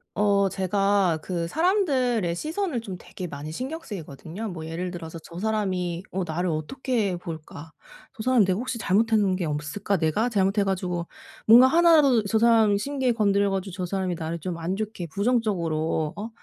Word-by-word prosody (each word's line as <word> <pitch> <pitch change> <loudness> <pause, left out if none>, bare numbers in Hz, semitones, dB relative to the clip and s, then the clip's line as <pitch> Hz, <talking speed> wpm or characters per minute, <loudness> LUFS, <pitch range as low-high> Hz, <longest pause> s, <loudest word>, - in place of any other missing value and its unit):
어 200 -1 +3
제가 195 -2 +1
그 170 -1 -3
사람들의 260 - +1
시선을 315 - -2
좀 195 -5 -7
되게 180 0 -8
많이 145 0 -7
신경 265 - -4
쓰이거든요. 175 - -7
뭐 165 -4 -7
예를 170 +3 -4
들어서 165 -2 -7
'저 170 +1 -12
사람이 185 -5 -1
어 190 0 -1
나를 175 +2 -2
어떻게 200 - -1
볼까?', 160 -2 -9 0.4
'저 215 - -7
사람 255 -2 +4
내가 185 -1 +1
혹시 250 +1 -3
잘못한 210 -1 +2
게 185 -2 -2
없을까?', 150 +7 -2
'내가 170 +9 +1
잘못해 200 -1 +2
가지고 180 -3 -2 0.4
뭔가 240 +4 +8
하나라도 300 -6 +5
저 220 +2 +1
사람 225 -3 +4
심기 260 +2 0
건드려 200 -2 +2
가지고 190 -1 -9
저 185 0 -3
사람이 185 -1 -2
나를 165 +1 -4
좀 170 +1 -4
안 170 +3 -2
좋게 210 -3 -4
부정적으로 170 -8 0
어 210 +3 -5
195 Hz, 350 characters per minute, -25 LUFS, 170-225 Hz, 0.4 s, 뭔가